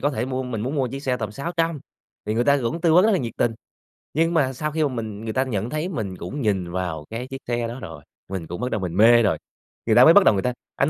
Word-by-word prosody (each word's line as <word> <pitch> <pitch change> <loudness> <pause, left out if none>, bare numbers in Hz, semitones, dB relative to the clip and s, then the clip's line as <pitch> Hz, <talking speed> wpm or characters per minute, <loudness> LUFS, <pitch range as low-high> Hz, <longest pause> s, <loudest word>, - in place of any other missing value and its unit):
có 145 - +1
thể 120 -4 -2
mua 130 0 -2
mình 125 -4 -4
muốn 130 +7 -3
mua 135 -4 0
chiếc 135 +3 -6
xe 130 -3 0
tầm 105 -4 -4
600, 165 +3 -2 0.5
thì 105 - -1
người 120 +2 +1
ta 140 +1 +4
cũng 140 +9 -2
tư 165 -1 +3
vấn 180 +3 +7
rất 220 - +4
là 195 - +3
nhiệt 120 -7 -4
tình. 120 - +2 0.6
Nhưng 165 +2 +2
mà 135 -5 +2
sau 150 +4 -3
khi 160 +1 0
mà 145 - +1
mình 110 -4 -5
người 110 -1 -4
ta 130 - +2
nhận 115 -4 -3
thấy 155 +6 -2
mình 110 - -4
cũng 140 +13 -5
nhìn 95 -6 0
vào 85 -4 -3
cái 115 +3 -5
chiếc 135 0 -8
xe 120 -1 -1
đó 120 +3 -7
rồi, 80 -7 -9 0.3
mình 95 -4 -5
cũng 90 - -6
bắt 125 0 -2
đầu 110 - -1
mình 90 -2 -3
mê 120 +2 +7
rồi. 105 - +2 0.5
Người - - +3
ta - - +8
mới 160 - +8
bắt 205 - +7
đầu - - +5
người 95 - -1
ta: 125 0 0 0.2
"Anh 135 - +2
125 Hz, 300 wpm, -23 LUFS, 105-145 Hz, 0.6 s, ta